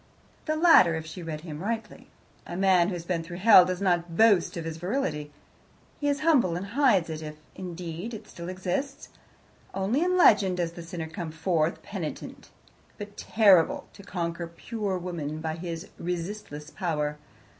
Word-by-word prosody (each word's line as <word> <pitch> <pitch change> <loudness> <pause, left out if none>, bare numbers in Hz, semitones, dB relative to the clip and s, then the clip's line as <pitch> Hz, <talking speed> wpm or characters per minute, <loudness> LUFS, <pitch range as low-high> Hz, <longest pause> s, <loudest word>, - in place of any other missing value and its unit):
The 310 - 0
latter, 310 - +6
if 160 0 -5
she 160 +3 -8
read 160 -2 -5
him 155 -2 -7
rightly. 220 +1 -5 0.4
A 175 - -5
man 185 -3 +4
who 195 - -2
has 170 -1 -7
been 170 -2 -1
through 175 +1 -8
hell 190 -2 +8
does 180 0 -2
not 175 -2 0
boast 205 -7 +4
of 165 - -4
his 165 -1 -5
virility. 165 - -2 0.7
He 290 - -1
is 285 -1 0
humble 270 - +3
and 180 +3 -4
hides 230 - +3
it, 155 0 -5
if, 155 -1 -7 0.2
indeed, 180 +4 -6
it 210 - -10
still 170 +1 -8
exists. 185 +10 -3 0.7
Only 195 +9 0
in 365 +1 +2
legend 195 - +5
does 170 -2 -1
the 170 - -9
sinner 165 0 -6
come 165 +1 -6
forth 160 0 -1
penitent, - - -7 0.5
but 205 -1 -8
terrible, 195 -7 +4
to - - -13
conquer 170 -3 -4
pure 200 +3 -4
woman 165 -4 -4
by 160 0 -3
his 165 0 -6
resistless 170 -3 -5
power. 150 -4 -2
180 Hz, 170 wpm, -27 LUFS, 165-205 Hz, 0.7 s, hell